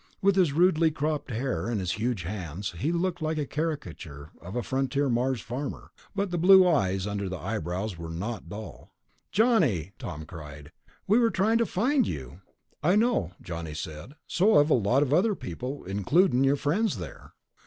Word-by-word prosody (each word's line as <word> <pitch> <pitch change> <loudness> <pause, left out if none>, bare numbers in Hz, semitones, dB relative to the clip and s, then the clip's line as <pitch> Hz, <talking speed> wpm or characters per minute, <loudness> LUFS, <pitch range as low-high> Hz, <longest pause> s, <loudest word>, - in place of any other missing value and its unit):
With 195 0 +3
his 180 -6 +4
rudely 165 +1 +4
cropped 150 -1 -2
hair 125 +1 -2
and 115 -3 -1
his 90 -2 -1
huge 110 0 -1
hands, 90 0 -5
he 155 - 0
looked 175 0 -1
like 155 0 -1
a 150 - -1
caricature 85 - -5
of 90 +6 -8
a 120 - -1
frontier 135 +2 0
Mars 125 0 0
farmer, 130 +5 -6 0.2
but 200 -2 -1
the 175 - -1
blue 185 +1 +7
eyes 95 - +1
under 100 -2 -3
the 95 - -4
eyebrows 95 -1 -3
were 85 -1 -6
not 90 +3 -5
dull. 105 +3 -9 0.4
"Johnny!" 165 - +2
Tom 75 +1 -6
cried. 75 -4 -10 0.3
"We 215 +5 +4
were 230 -1 +4
trying 220 +3 +2
to 230 - +2
find 250 +5 +2
you." 70 +6 -6 0.4
"I 175 +5 +3
know," 210 - +2
Johnny 85 -3 -6
said. 75 - -7
"So 205 +2 +3
have 145 +2 +4
a - - +7
lot 120 +5 +3
of 140 -1 -1
other 200 +6 +3
people, 125 - -6
includin' 125 - +2
your 135 +1 +4
friends 170 - 0
there." 85 -6 -9
130 Hz, 180 wpm, -27 LUFS, -, 0.4 s, blue